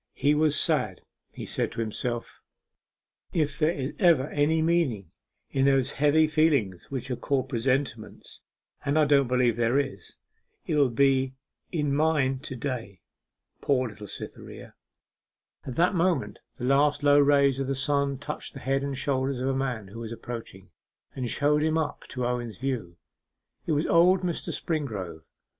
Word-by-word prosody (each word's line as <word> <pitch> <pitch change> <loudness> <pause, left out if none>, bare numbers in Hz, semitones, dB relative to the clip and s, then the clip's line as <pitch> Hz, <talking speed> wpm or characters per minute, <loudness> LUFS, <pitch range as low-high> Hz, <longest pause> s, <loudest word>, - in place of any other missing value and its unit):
He 145 - +3
was 150 0 +2
sad; - - 0 0.3
he - - -8
said - - -1
to - - -7
himself 115 +2 -4 0.9
'If 150 -4 0
there 155 0 +3
is 140 -5 -3
ever 160 -7 +4
any 150 +2 +2
meaning 155 - 0 0.4
in 135 0 +2
those 135 -1 +3
heavy 150 +2 +5
feelings 150 - +1
which 130 -1 -5
are - - 0
called 135 +1 -1
presentiments 130 +4 -2 0.4
and 145 +1 +1
I 155 - +5
don't 140 -2 +4
believe 125 -2 +2
there 120 +2 +2
is 135 -10 -3 0.5
there 155 - 0
will 140 -3 +4
be 130 +1 +2 0.4
in 150 -5 0
mine 140 -3 +2
to 135 -1 -7
day.... 115 - -5 0.6
Poor 130 -3 +1
little 105 -1 -10
Cytherea!' - - -9 0.9
At 130 - -5
that 175 +6 +3
moment 180 0 0 0.2
the - - -8
last 145 +2 +3
low 145 0 +6
rays 140 -2 +4
of 135 - -2
the 135 - -1
sun 140 +1 0
touched 145 +2 -6
the - - -6
head 135 +1 0
and 140 -1 -3
shoulders 135 -1 0
of 130 +1 -1
a - - +1
man 125 -7 -2
who 115 +4 -9
was 115 -1 -6
approaching, 115 -4 -8 0.4
and 125 -3 -3
showed 150 +3 +2
him 160 +1 +1
up 160 -2 -3
to 125 -2 -3
Owen's 120 -4 -3
view. 120 -10 -3 0.7
It 160 - +1
was 150 +2 +1
old 180 +2 +5
Mr. 175 -3 -3
Springrove. 105 - -4
135 Hz, 165 wpm, -27 LUFS, 125-150 Hz, 0.9 s, low